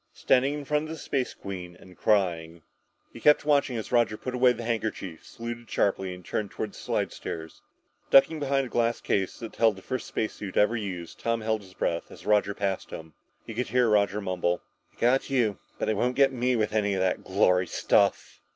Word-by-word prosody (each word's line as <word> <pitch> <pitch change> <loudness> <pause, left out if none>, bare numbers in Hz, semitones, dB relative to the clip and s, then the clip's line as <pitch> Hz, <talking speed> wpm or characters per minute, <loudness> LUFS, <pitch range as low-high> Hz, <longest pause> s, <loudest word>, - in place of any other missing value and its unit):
Standing 135 +3 +2
in 145 -1 -6
front 150 +2 0
of - - -8
the 160 - -5
Space 135 -4 -2
Queen 90 -3 -7
and 90 -1 -15
crying! 85 -6 0 0.5
He - - -9
kept 150 0 +5
watching 140 -4 +2
as 110 -2 -6
Roger 120 -3 +2
put 130 - -5
away 125 0 +5
the 120 -1 -5
handkerchief, 110 -7 -3
saluted 120 0 -7
sharply 95 -2 0
and 90 0 -10
turned 105 -2 -2
toward 105 +1 -4
the - - -14
slidestairs. 80 -1 -4 0.5
Ducking 155 +4 +6
behind 140 -1 +1
a - - -8
glass 120 0 +1
case 95 -2 -1
that 115 -2 -8
held 115 -3 +4
the 95 - -13
first 130 -1 -4
space 110 - -2
suit 100 -2 -7
ever 105 +3 +4
used, 95 -6 -5
Tom 115 -1 -1
held 110 0 0
his 95 -2 -16
breath 85 0 -2
as - - -13
Roger 105 -1 +2
passed 100 -2 -2
him. 80 -1 -9 0.3
He 115 - -7
could 125 +3 -2
hear 125 -1 +3
Roger 105 -1 +2
mumble. 90 -2 -1 0.3
"They - - -24
got 125 +3 +3
you 120 -7 +1 0.2
but - - -1
they 110 - +1
won't 125 +4 0
get 135 -1 +4
me 125 0 +1
with 110 -2 0
any 100 -2 +1
of 95 - -1
that 95 -1 0
glory 90 -2 +2
stuff!" 100 +3 +1
110 Hz, 210 wpm, -27 LUFS, 95-125 Hz, 0.5 s, Ducking